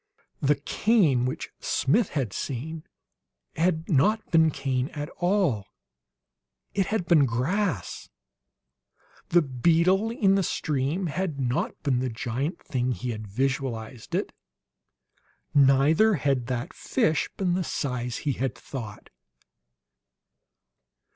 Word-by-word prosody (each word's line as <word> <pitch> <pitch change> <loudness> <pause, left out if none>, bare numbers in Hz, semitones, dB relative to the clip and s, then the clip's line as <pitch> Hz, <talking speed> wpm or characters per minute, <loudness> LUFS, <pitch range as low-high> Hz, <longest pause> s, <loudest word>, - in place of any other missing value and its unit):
The 145 +1 +3
"cane" 150 - +2
which 135 +5 -4
Smith 190 - +1
had 120 -8 -1
seen 155 +5 -5 0.7
had 165 0 +1
not 210 +8 +2
been 160 -1 +5
cane 135 -2 -1
at 145 +1 -4
all; 175 - +1 1.1
it 195 -2 +1
had 215 -5 -1
been 155 -6 +5
grass. 130 - -1 1.2
The 175 0 +5
"beetle" 170 - +2
in 205 -4 +2
the 195 - +3
stream 155 +1 -1
had 165 -2 -2
not 125 -2 -2
been 135 -5 +1
the 130 0 -1
giant 125 +8 -3
thing 125 -1 -1
he 125 0 -4
had 110 -1 -6
visualized 125 0 -3
it; - - -2 1.2
neither 145 +10 +5
had 135 -5 0
that 125 -2 -3
fish 160 - 0
been 185 -3 +1
the 185 +1 0
size 125 -6 -3
he 145 - +2
had 130 0 -2
thought. 110 -6 -8
140 Hz, 115 wpm, -26 LUFS, 125-175 Hz, 1.2 s, been